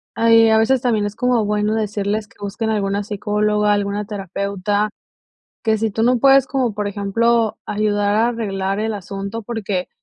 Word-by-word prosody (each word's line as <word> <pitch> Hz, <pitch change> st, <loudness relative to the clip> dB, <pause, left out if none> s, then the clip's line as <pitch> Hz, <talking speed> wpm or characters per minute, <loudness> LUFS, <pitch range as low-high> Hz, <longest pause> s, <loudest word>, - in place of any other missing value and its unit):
Ahí 225 Hz, 0 st, +5 dB
a 220 Hz, -, +4 dB
veces 245 Hz, +3 st, +3 dB
también 220 Hz, -4 st, +1 dB
es 205 Hz, -, -4 dB
como 245 Hz, -2 st, +1 dB
bueno 210 Hz, +1 st, 0 dB
decirles 210 Hz, 0 st, -2 dB
que -, -, -26 dB
busquen 220 Hz, +2 st, -3 dB
alguna 200 Hz, -1 st, -1 dB
psicóloga, 210 Hz, 0 st, 0 dB
alguna 205 Hz, 0 st, -1 dB
terapeuta. 200 Hz, +1 st, -2 dB, 0.7 s
Que 220 Hz, -1 st, +2 dB
si 220 Hz, +1 st, 0 dB
tú 220 Hz, +2 st, -2 dB
no 245 Hz, +1 st, +3 dB
puedes, 270 Hz, +1 st, +5 dB
como 255 Hz, -5 st, 0 dB
por 210 Hz, -1 st, -2 dB
ejemplo, 220 Hz, +3 st, +1 dB
ayudar 205 Hz, -1 st, 0 dB
a 225 Hz, +2 st, +3 dB
arreglar 195 Hz, -4 st, -2 dB
el 220 Hz, 0 st, -1 dB
asunto 200 Hz, +3 st, -6 dB
porque, 205 Hz, -5 st, -3 dB
210 Hz, 170 wpm, -19 LUFS, 205-225 Hz, 0.7 s, Ahí